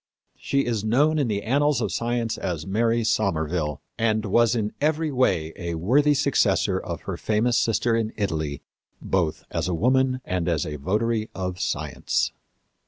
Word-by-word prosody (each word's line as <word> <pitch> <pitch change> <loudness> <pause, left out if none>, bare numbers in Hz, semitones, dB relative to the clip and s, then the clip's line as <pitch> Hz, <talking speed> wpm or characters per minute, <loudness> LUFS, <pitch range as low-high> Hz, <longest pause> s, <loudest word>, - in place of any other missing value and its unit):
She 140 0 0
is 115 -4 -1
known 145 +8 +3
in 140 - +1
the 100 -2 -2
annals 140 +2 +2
of 110 - -1
science 120 -1 -1
as 85 -5 -4
Mary 115 +4 +1
Somerville, 80 -8 0 0.2
and 110 -1 +1
was 115 +3 +3
in 105 -2 -1
every 155 +1 +1
way 85 - +1
a 85 -3 -4
worthy 140 - +3
successor 140 0 +2
of - - -6
her - - -5
famous 110 +3 +1
sister 115 0 +2
in 110 -1 -1
Italy, 80 -8 -2 0.4
both 85 -5 -1
as - - -1
a 90 - 0
woman 130 +6 +2
and 90 -1 -1
as 80 -4 0
a 75 -1 -5
votary 110 +8 -1
of 90 -1 -4
science. 80 -7 -1
110 Hz, 165 wpm, -24 LUFS, 90-120 Hz, 0.4 s, known